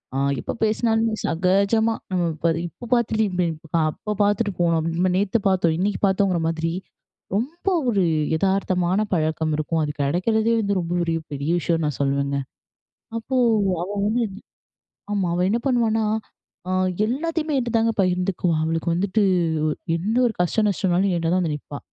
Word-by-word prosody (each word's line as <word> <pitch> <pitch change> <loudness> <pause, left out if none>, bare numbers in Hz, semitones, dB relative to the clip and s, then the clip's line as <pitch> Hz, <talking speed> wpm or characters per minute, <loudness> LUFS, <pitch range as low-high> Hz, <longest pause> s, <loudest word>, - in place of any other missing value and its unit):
அ - - 0 0.2
எப்ப - - -4
பேசினாலுமே 225 0 +1
சகஜமா 200 +6 +2 0.2
நம்ப 180 -2 +1
இப்ப 165 +1 0 0.2
இப்போ 240 - -11
பாத்து, 220 -2 +2 0.7
அப்போ 210 - -6
பாத்துட்டு 205 +1 +1
போனோம். 165 -2 +2
நம்ப 185 +2 +2
நேத்து 205 +3 +1
பாத்தோம். 175 -4 +2
இன்னைக்கு 200 +2 0
பாத்தோங்குற 190 -2 +1
மாதிரி, 165 0 -2 0.6
ரொம்ப 295 - -3 0.2
ஒரு 200 -5 +2 0.4
எதார்த்தமான 190 0 +1
பழக்கம் 155 -1 0
இருக்கும். 155 +2 -1
அது 150 - -1
கிடைக்குறதே 215 +10 +1
வந்து 200 -2 0
ரொம்ப 170 -1 -4
ஒரு 165 - -1 0.2
பெரிய 140 +2 -3
விஷயம் 165 -1 0
நான் 150 -3 -2
சொல்வேங்க. 140 0 0 0.8
அப்போ, 245 +4 -4 0.5
அவ 180 - -3 1.0
வந்து - - -74 0.2
ஆமா, 195 -3 0
அவ 175 - -1
என்ன 230 - +2
பண்ணுவான்னா, 225 -4 +2 0.6
அ - - -2 0.4
எல்லாத்தையுமே 310 +4 -1
என்கிட்ட 240 -2 -2
தாங்க 225 0 +2
பகிர்ந்துக்குவா, 180 -2 +1
அவளுக்கு 165 +1 -1
வந்துட்டு 195 +4 +1 0.7
எந்த 205 +7 -1
ஒரு 230 - 0
கஷ்ட, 180 +5 +2
நஷ்டம்னாலும் 190 0 +1
என்ட்ட 165 -1 -1
தான் 185 - +3
வந்து 155 -4 -1
நிப்பா. 145 0 -9
190 Hz, 145 wpm, -23 LUFS, 165-220 Hz, 1.0 s, தான்